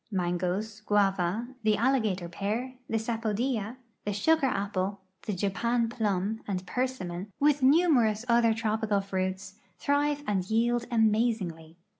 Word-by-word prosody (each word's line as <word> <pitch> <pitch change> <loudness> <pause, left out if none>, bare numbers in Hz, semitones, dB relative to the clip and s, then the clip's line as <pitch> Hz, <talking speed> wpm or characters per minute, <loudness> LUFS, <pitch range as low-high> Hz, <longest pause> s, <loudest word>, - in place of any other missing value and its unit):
Mangos, 185 +3 -2
guava, 200 +2 +1
the 215 -1 +2
alligator 220 -8 +1
pear, 215 +9 -3 0.2
the 225 - +1
sapodilla, 225 0 -1 0.3
the 205 - -2
sugar 300 +7 +3
apple, 200 -3 -2 0.3
the 210 - 0
Japan 230 +5 0
plum 215 -2 -1
and 185 -2 -3
persimmon, 200 -6 -3
with 290 0 +3
numer 280 -4 +5
ous 215 +3 -4
otlier 235 -2 +4
tropical 220 -2 0
fruits, 190 +1 -3 0.2
thrive 290 0 +1
and 190 -3 -1
yield 235 +2 +1
amazingly. 215 -8 0
215 Hz, 125 wpm, -28 LUFS, 195-240 Hz, 0.3 s, numer